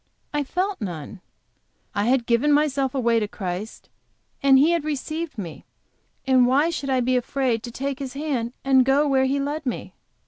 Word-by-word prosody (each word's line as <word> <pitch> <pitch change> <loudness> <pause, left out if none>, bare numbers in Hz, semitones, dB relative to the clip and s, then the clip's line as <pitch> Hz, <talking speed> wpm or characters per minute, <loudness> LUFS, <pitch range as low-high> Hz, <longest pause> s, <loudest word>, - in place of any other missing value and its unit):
I 295 0 0
felt 370 +6 -2
none. 180 -1 -6 0.7
I 205 0 0
had 245 0 +2
given 240 +6 +2
myself 280 -2 +1
away 235 -3 +2
to 210 - -1
Christ, 190 +2 -6 0.5
and 275 -1 +6
He 300 +5 +5
had 340 -3 +1
received 310 +1 -4
me 175 -6 -7 0.6
and 260 -2 +4
why 285 +6 +3
should 280 -4 -4
I 260 -1 +2
be 255 +1 +1
afraid 250 -2 0
to 240 - -7
take 275 +2 -4
His 265 -2 -5
hand 275 -5 -2
and 265 -1 +5
go 275 +3 +3
where 265 -1 +3
He 275 +2 0
led 290 +3 -3
me? 255 - -4
265 Hz, 180 wpm, -23 LUFS, 235-285 Hz, 0.7 s, and